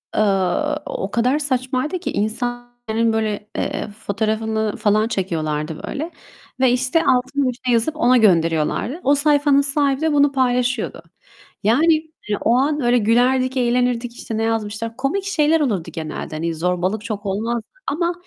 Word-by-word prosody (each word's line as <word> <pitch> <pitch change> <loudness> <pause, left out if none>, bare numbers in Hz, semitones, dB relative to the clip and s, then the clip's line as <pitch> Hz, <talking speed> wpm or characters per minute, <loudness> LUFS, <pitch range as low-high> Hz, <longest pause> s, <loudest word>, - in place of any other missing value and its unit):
eee, 195 -4 +1
o - - -4
kadar 250 +5 +2
saçmaydı 265 +4 -1
ki - - -4
insanların, 240 0 -2
böyle, 215 -1 -2
eee, - - -2
fotoğrafını 220 +1 -2
falan 215 0 +2
çekiyorlardı, 160 -6 -3
böyle. 310 +4 -4 0.5
Ve, 260 -2 +4
işte, 260 +6 +1
altına 260 +1 +2
bir - - -2
şey 245 - +2
yazıp 235 +7 +1
ona 250 -3 +4
gönderiyorlardı. 170 - +2
O 280 +2 +4
sayfanın 290 -1 +3
sahibi 280 0 +1
de 320 -1 +1
bunu 285 -1 +4
paylaşıyordu. 250 -7 0 0.6
Yani, 290 +11 +4 0.4
eee, 205 - 0
o 230 - +3
an 290 +3 +1
öyle 245 0 +3
gülerdik, 255 +4 +2
eğlenirdik. 245 -1 0
İşte, 220 -2 -5
ne 225 - 0
yazmışlar? 225 0 -2
Komik 280 +10 -1
şeyler 320 -4 +2
olurdu 205 - -1
genelde. 155 -1 -5
Hani, 165 +1 -2
zorbalık 180 +5 -1
çok 210 -2 -5
olmazdı 220 +4 -2 0.2
ama 340 +3 0
240 Hz, 150 wpm, -20 LUFS, 215-275 Hz, 0.6 s, Ve